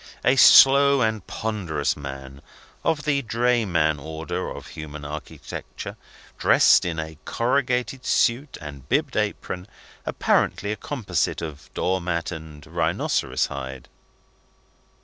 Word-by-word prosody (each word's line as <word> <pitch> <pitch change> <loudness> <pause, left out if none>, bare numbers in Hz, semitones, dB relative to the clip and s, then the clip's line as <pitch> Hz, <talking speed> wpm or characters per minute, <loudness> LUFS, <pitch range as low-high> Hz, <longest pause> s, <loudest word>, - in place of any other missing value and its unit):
A 125 +3 +5
slow 140 +1 +7
and 110 -4 -1
ponderous 90 -10 -2
man, 70 -1 -8 0.4
of 155 -2 0
the 140 -2 +1
drayman 110 - +1
order 80 +2 -4
of - - -9
human 75 -1 -8
architecture, 75 +1 -7 0.4
dressed - - +5
in 85 -2 -2
a 80 -1 -6
corrugated 125 +1 0
suit 125 +3 +1
and 70 -3 -10
bibbed - - +1
apron, 90 +1 -2 0.4
apparently 100 - +1
a - - -1
composite 100 - -2
of 75 -2 -8
door 95 +1 0
mat 85 -1 -2
and 80 -3 -9
rhinoceros 80 0 0
hide. 65 -1 -7
85 Hz, 115 wpm, -24 LUFS, 75-120 Hz, 0.4 s, slow